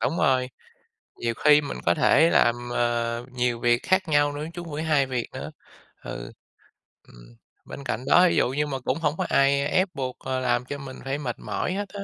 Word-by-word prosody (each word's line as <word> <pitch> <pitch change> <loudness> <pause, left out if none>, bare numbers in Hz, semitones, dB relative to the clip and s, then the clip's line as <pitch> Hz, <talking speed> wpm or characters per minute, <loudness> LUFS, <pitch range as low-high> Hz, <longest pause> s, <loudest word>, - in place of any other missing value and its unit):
Đúng 165 - -1
rồi. 130 -1 +2 0.7
Nhiều 115 -1 -2
khi 150 +3 +5
mình 145 - -6
có - - +4
thể 165 +1 +4
làm, 120 +1 +2
à, 120 -1 0
nhiều 125 -2 -1
việc 120 +1 +3
khác 190 -1 +1
nhau 145 -1 +3
nữa, 150 +2 -5
chứ 175 - -6
hông 155 -3 -8
phải 155 - -3
2 145 -4 +2
việc 125 -2 -3
nữa, - - -6 0.5
ừ. - - -7 0.8
Ừm, - - -17 0.3
bên 140 - -9
cạnh 125 0 -3
đó, 180 - +6
thí - - 0
dụ - - +3
như 145 +3 -1
mà 135 -2 -3
cũng 130 - -2
hổng 150 -2 0
có - - -1
ai 140 0 +3
ép 185 +4 +2
buộc, 130 -2 -4
à, 130 0 -3
làm 120 -1 0
cho 140 +3 -6
mình 135 -1 -9
phải 135 +2 -2
mệt 125 -5 -4
mỏi - - -3
hết 205 +1 -3
á. 200 - -8
135 Hz, 220 wpm, -25 LUFS, 120-150 Hz, 0.8 s, đó